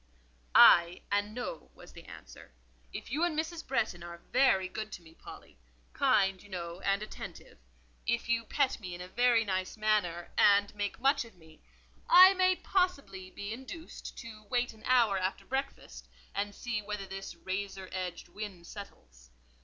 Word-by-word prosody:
"Ay, 170 +1 +7
and 205 +1 +1
No," 245 -11 -6
was - - -15
the - - -12
answer. - - -13 0.4
"If - - -8
you 300 +6 0
and 345 -3 0
Mrs. 325 +1 -3
Bretton 220 -9 -1
are 170 0 -8
very 220 -8 +4
good 215 +3 -6
to 175 - -8
me, 160 -1 -16
Polly—kind, - - -2
you 205 - -16
know, 170 -2 -6
and 195 +1 0
attentive; 215 - -10 0.5
if 235 0 0
you 235 0 +1
pet 270 +3 0
me 180 -4 -7
in 175 - -9
a 180 - -7
very 235 +3 +3
nice 185 0 -2
manner, 205 -6 0
and 200 0 +5
make 205 -1 -4
much 275 +2 +3
of 230 -4 -15
me, 160 -2 -19 0.5
I 370 +2 +10
may 370 -1 +3
possibly 280 - -1
be 200 +3 -6
induced 265 +7 -9
to 225 -2 -9
wait 245 0 0
an 220 - -18
hour 230 -6 +4
after 185 +1 -3
breakfast 260 - -5 0.3
and 200 +1 -3
see 235 -4 -3
whether 210 -1 -5
this 195 0 -7
razor 190 0 -5
edged 185 -2 -5
wind 200 -5 -8
settles. - - -12
205 Hz, 165 wpm, -31 LUFS, 185-245 Hz, 0.5 s, I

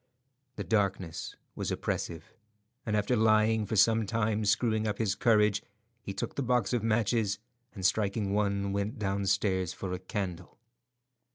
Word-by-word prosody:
The - - -4
darkness 95 -6 -1 0.2
was - - -3
oppressive, 85 +6 -3 0.5
and 105 -1 +1
after 105 +4 +1
lying 110 -1 +3
for 110 - -2
some 110 +1 +4
time 110 0 0
screwing 110 +2 +2
up 105 - -1
his 105 -3 +1
courage, 105 -1 +3 0.4
he 100 - -6
took 100 - -4
the - - -2
box 125 -5 +1
of 120 - +1
matches, 110 -2 +1 0.4
and 95 -3 -4
striking 100 0 +1
one, 100 -1 0
went 100 +5 -2
downstairs 100 -2 0
for 95 -2 -5
a 90 - -3
candle. 90 -2 -5
105 Hz, 150 wpm, -30 LUFS, 100-110 Hz, 0.5 s, some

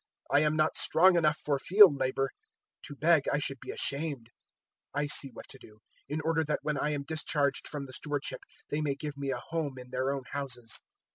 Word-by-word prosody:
I - - +5
am 150 0 +2
not 155 0 +2
strong 180 +3 +5
enough 155 -3 +3
for 140 -2 -1
field 195 0 +7
labour: 135 +1 0 0.5
to 145 - -7
beg, 155 +1 +3
I - - +2
should 135 -2 -2
be - - -10
ashamed. 140 -5 -2 0.6
016:004 145 - +1
I - - 0
see 145 -1 +1
what - - -11
to 135 - -8
do, 105 -3 -16 0.3
in 150 +2 -2
order 160 +1 +1
that 150 -1 -2
when 150 -1 -1
I 150 - 0
am 145 -2 -2
discharged 145 -2 0
from 145 -2 -4
the 130 - -11
stewardship 145 0 -3 0.3
they 150 - 0
may 145 -2 -1
give 150 +1 -6
me 140 -1 -4
a 135 - -1
home 155 -5 -2
in 125 0 -11
their 130 +1 -1
own 140 -1 -3
houses.' 125 -5 -4
145 Hz, 215 wpm, -30 LUFS, 135-155 Hz, 0.6 s, field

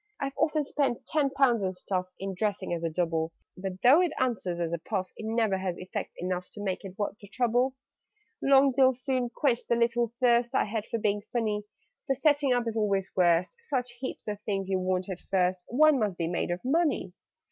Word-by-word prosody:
"I've 275 -1 -2
often 305 -1 +1
spent 275 -4 -1
ten 295 -3 +1
pounds 255 -6 +3
on 185 0 -1
stuff, 185 0 -3
In 195 0 -4
dressing 205 -2 -2
as 170 - -2
a 165 - -1
Double; 165 -1 -1 0.2
But, 190 0 -6
though 275 +8 +7
it 355 -3 +1
answers 210 -9 -1
as 170 -1 -1
a 170 - -1
puff, 185 +1 -3
It 220 - -6
never 220 -4 +1
has 185 -2 -3
effect 185 - -5
enough 180 0 -3
To 205 - -6
make 190 -1 -2
it 195 0 -9
worth 205 -1 -3
the 200 - -12
trouble. 245 +4 +1 0.7
"Long 275 0 +5
bills 260 -1 +3
soon 255 -3 0
quenched 245 -1 0
the 235 - +2
little 235 0 +2
thirst 240 0 +3
I - - +3
had 215 0 -3
for - - -2
being 205 -1 0
funny. 215 -3 -1 0.4
The 270 - +2
setting 290 -1 +3
up 245 -1 +2
is 225 - -2
always 200 -3 0
worst: 175 - +3
Such 255 - -2
heaps 260 -3 -6
of 210 -1 -4
things 195 -2 -2
you 190 -1 +1
want 185 0 -1
at 185 -3 -6
first, 185 -1 0
One 300 +3 +5
must 205 -5 -1
be 170 - -1
made 175 +1 -1
of 175 +1 -2
money! 285 - +1
215 Hz, 210 wpm, -28 LUFS, 185-255 Hz, 0.7 s, though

